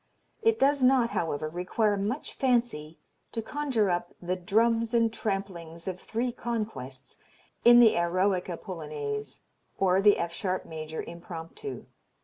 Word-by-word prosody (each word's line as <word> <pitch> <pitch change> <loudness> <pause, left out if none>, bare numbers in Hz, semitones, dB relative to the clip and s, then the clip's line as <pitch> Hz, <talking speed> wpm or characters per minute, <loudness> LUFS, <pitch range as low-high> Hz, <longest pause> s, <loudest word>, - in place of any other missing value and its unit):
It 445 0 +3
does 280 +1 +3
not, 255 -2 +4
however, 155 -2 -1
require 185 +6 0
much 210 +8 -3
fancy 235 - 0 0.4
to 225 - -2
conjure 255 -7 0
up 175 0 -2
"the 180 +1 -2
drums 225 +5 +2
and 230 -1 +3
tramplings 195 -6 -4
of 185 -1 -3
three 240 +2 -2
conquests" 210 - -5 0.4
in 240 0 +9
the 230 -2 +7
Eroica 180 +1 +1
Polonaise 150 -6 -5 0.4
or 190 0 +3
the 205 0 +6
F 170 0 -2
sharp 185 0 -2
major 160 0 -6
Impromptu. 170 - -8
195 Hz, 130 wpm, -28 LUFS, 170-230 Hz, 0.4 s, in